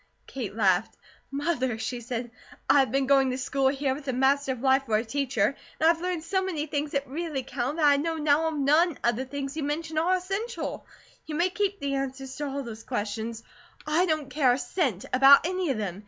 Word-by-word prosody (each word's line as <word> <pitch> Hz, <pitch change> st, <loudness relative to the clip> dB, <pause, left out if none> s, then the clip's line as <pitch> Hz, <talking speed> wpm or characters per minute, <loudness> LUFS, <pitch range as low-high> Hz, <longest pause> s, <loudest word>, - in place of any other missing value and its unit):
Kate 230 Hz, -7 st, -6 dB
laughed: 195 Hz, -1 st, +2 dB, 0.3 s
"Mother," 275 Hz, -5 st, -1 dB
she 240 Hz, +2 st, -4 dB
said, 240 Hz, 0 st, -4 dB, 0.4 s
"I 285 Hz, -, +6 dB
have 265 Hz, -, +2 dB
been 270 Hz, +1 st, +1 dB
going 270 Hz, -1 st, +4 dB
to 255 Hz, -, -2 dB
school 270 Hz, +1 st, 0 dB
here, 270 Hz, 0 st, 0 dB
with 275 Hz, +1 st, -8 dB
the 260 Hz, -, -2 dB
Master 270 Hz, +2 st, +2 dB
of 245 Hz, -, -9 dB
Life 265 Hz, 0 st, +3 dB
for 215 Hz, -, +2 dB
a 225 Hz, -, -2 dB
teacher; 265 Hz, -2 st, 0 dB, 0.2 s
and 320 Hz, -, +4 dB
I've 330 Hz, -1 st, -4 dB
learned 360 Hz, -3 st, -2 dB
so 380 Hz, +2 st, 0 dB
many 330 Hz, -6 st, -2 dB
things 295 Hz, -1 st, -3 dB
that 280 Hz, 0 st, -1 dB
really 295 Hz, -1 st, -3 dB
count, 255 Hz, +4 st, -3 dB
that 315 Hz, -, +2 dB
I 285 Hz, -1 st, +6 dB
know 325 Hz, +3 st, -1 dB
now 305 Hz, +1 st, +2 dB
NONE 305 Hz, +2 st, +2 dB
of 240 Hz, -1 st, +2 dB
the 260 Hz, +3 st, -3 dB
things 275 Hz, +1 st, -5 dB
you 315 Hz, -, -3 dB
mention 310 Hz, +2 st, -2 dB
are 355 Hz, +4 st, +3 dB
essential. 390 Hz, +6 st, -4 dB, 0.4 s
You 305 Hz, -, -4 dB
may 350 Hz, +3 st, +1 dB
keep 400 Hz, +1 st, -1 dB
the 280 Hz, -1 st, -2 dB
answers 270 Hz, -1 st, -4 dB
to 295 Hz, -, -3 dB
all 275 Hz, 0 st, -4 dB
those 225 Hz, -2 st, -8 dB
questions; 220 Hz, 0 st, -4 dB, 0.4 s
I 325 Hz, +4 st, +2 dB
don't 310 Hz, -4 st, -1 dB
care 260 Hz, -3 st, +3 dB
a -, -, 0 dB
cent 250 Hz, -, -1 dB
about 270 Hz, +3 st, +7 dB
any 365 Hz, -1 st, -1 dB
of 265 Hz, -, 0 dB
them. 195 Hz, -3 st, -4 dB
275 Hz, 220 wpm, -27 LUFS, 255-315 Hz, 0.4 s, about